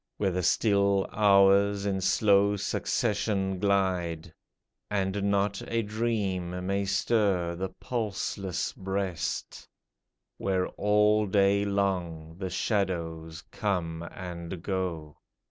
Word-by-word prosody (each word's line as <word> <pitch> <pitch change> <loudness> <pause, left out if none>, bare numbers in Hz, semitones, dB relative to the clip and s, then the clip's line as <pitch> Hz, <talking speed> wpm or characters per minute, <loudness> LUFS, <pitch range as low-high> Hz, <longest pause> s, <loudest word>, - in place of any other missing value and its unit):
Where 100 -2 +1
the 90 +1 -1
still 100 0 +2
hours 100 -1 +4
in 95 -1 -1
slow 100 +1 +3
succession 100 -2 -1
glide. 90 -4 0 0.6
And 100 0 0
not 100 0 0
a 115 0 0
dream 100 -5 -2
may 100 +1 0
stir 95 -3 +1
the 95 +2 -4
pulseless 100 -4 -3
breast 95 -3 -3 0.3
— - - -58
Where 95 -2 0
all 105 +1 +2
day 100 +1 +3
long 90 -5 -2
the 95 -2 -3
shadows 85 -5 -2
come 85 -6 -2
and 85 -1 -7
go. 85 -6 -3
95 Hz, 105 wpm, -28 LUFS, 90-100 Hz, 0.6 s, hours